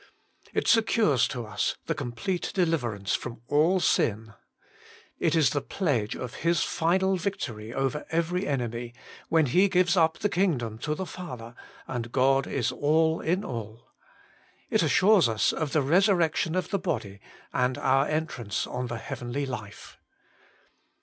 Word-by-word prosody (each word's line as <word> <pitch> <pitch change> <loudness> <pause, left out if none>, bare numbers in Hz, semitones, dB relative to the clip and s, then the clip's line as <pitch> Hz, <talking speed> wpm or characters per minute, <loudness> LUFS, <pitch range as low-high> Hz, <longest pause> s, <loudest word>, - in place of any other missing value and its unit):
It - - -1
secures 220 - +3
to 120 -2 -5
us 105 -1 -2
the - - 0
complete 120 +10 -3
deliverance 125 - 0
from 120 -2 -4
all 160 +8 +3
sin. 110 - +1 0.9
It 165 0 +2
is 155 -7 +4
the 145 - -1
pledge 135 - -1
of 125 0 -6
His 170 -1 +2
final 190 +3 +1
victory 120 - -4
over 135 +3 -2
every 170 +4 -1
enemy, 120 -3 -3 0.3
when 160 -2 +4
He 185 +10 +3
gives 180 -1 +3
up 160 -2 +3
the 205 - 0
kingdom 140 - 0
to 150 +5 -2
the 190 - -4
Father, 125 -12 -8 0.3
and 120 -2 -4
God 135 +1 +3
is 125 -4 -1
all 160 +2 +2
in 180 +5 0
all. 115 -1 -7 0.8
It - - +3
assures 190 - +4
us 110 -1 +1
of 155 -3 -2
the 155 - +2
resurrection 170 0 +2
of 185 - -2
the 200 - +1
body, 100 - -4 0.3
and 125 0 +1
our 135 +2 +2
entrance 145 - -2
on 125 0 -4
the 120 -1 -4
heavenly 125 +2 -4
life. 110 -6 -8
140 Hz, 150 wpm, -27 LUFS, 120-175 Hz, 0.9 s, is